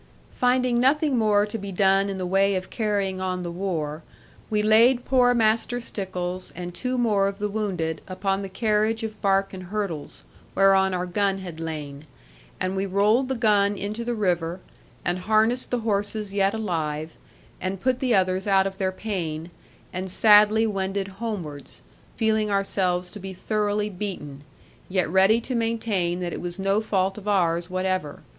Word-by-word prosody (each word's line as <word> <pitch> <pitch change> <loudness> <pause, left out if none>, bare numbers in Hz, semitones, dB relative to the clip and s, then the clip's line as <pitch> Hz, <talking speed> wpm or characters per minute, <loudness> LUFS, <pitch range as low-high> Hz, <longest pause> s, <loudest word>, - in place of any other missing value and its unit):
Finding 250 -1 +2
nothing 280 +2 +3
more 210 -3 +3
to 215 +2 -5
be 200 0 -6
done 195 +1 +3
in 195 - -3
the 185 - -3
way 195 +2 +2
of 185 0 -4
carrying 200 -4 -1
on 185 -1 -2
the 175 - -4
war, 165 -4 -3 0.5
we 210 -1 +1
laid 235 +4 +5
poor 250 -2 +4
Master 225 +2 +2
Stickles 185 -5 -4
and 175 0 -6
two 255 +6 -2
more 210 -5 +2
of 195 0 -4
the 210 0 -1
wounded 190 -7 -2
upon 195 +1 -1
the 195 - -5
carriage 215 +2 0
of 220 -1 -6
bark 195 -1 +2
and 185 -1 -7
hurdles, 190 -6 -4 0.3
whereon 195 -1 +4
our 180 0 -1
gun 195 +1 0
had 180 -4 -8
lain; 155 -2 -6 0.5
and 185 +1 -1
we 195 +1 -1
rolled 210 +7 +3
the 265 - -1
gun 205 -3 +2
into 210 +4 -4
the 240 0 -2
river, 175 -4 0 0.5
and 175 +1 0
harnessed 220 +5 +2
the 245 -1 -1
horses 205 -1 -1
yet 200 +1 +2
alive, 160 -7 -2 0.5
and 185 +1 -3
put 255 +4 0
the 255 -3 +2
others 185 +1 +1
out 195 -1 +4
of 195 0 -4
their 190 -1 +1
pain, 175 -5 -4 0.4
and 185 +1 -4
sadly 215 +3 +6
wended 195 -1 -2
homewards, 175 -11 -5 0.3
feeling 220 -2 +1
ourselves 185 -3 0
to 210 - -9
be 190 0 -7
thoroughly 210 +1 -1
beaten, 180 -8 -6 0.5
yet 185 -1 +1
ready 190 +6 +4
to 245 +2 -5
maintain 220 -7 -1
that 175 -1 -3
it - - -5
was 175 0 -5
no 195 +2 +1
fault 195 -2 0
of 210 - -12
ours 175 -3 +1
whatever. 185 -5 -2
195 Hz, 170 wpm, -25 LUFS, 185-215 Hz, 0.5 s, sadly